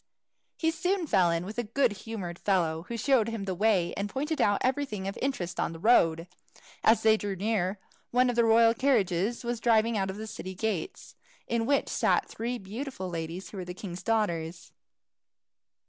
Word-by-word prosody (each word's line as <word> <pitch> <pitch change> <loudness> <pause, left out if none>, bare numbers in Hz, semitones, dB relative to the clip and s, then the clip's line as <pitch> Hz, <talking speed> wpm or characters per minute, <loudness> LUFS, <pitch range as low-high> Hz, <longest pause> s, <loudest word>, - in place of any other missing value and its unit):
He 325 -1 +1
soon 360 +3 -1
fell 185 - +3
in 170 +1 -1
with 215 +5 -5
a - - 0
good 250 +3 +1
humoured, 195 -4 -6
fellow 170 -4 0
who 235 - -4
showed 240 -2 +3
him 225 -3 -4
the 190 - -2
way, 185 -2 +2
and 200 +1 -3
pointed 300 +8 -2
out 205 -1 +3
everything 255 -7 -1
of 195 - -4
interest 250 -10 -2
on - - -1
the 165 - -9
road. 165 -6 +3 0.6
As 225 +1 +4
they 220 0 +5
drew 205 -2 -3
near, 195 -1 -1 0.3
one 250 +1 +3
of 245 - 0
the 235 - +4
royal 230 0 +5
carriages 230 -4 +1
was 240 -1 -2
driving 230 -1 +3
out 190 0 -1
of 190 - -5
the 215 - -5
city 190 -3 -7
gates, 200 -5 -3 0.3
in 230 -1 -1
which 280 -1 +2
sat - - +1
three 240 +2 -4
beautiful 205 -2 -6
ladies 165 +2 -5
who 205 - -8
were 185 - -5
the 180 0 -7
king's 185 -2 -7
daughters. 175 -7 -1
215 Hz, 190 wpm, -28 LUFS, 185-235 Hz, 0.6 s, they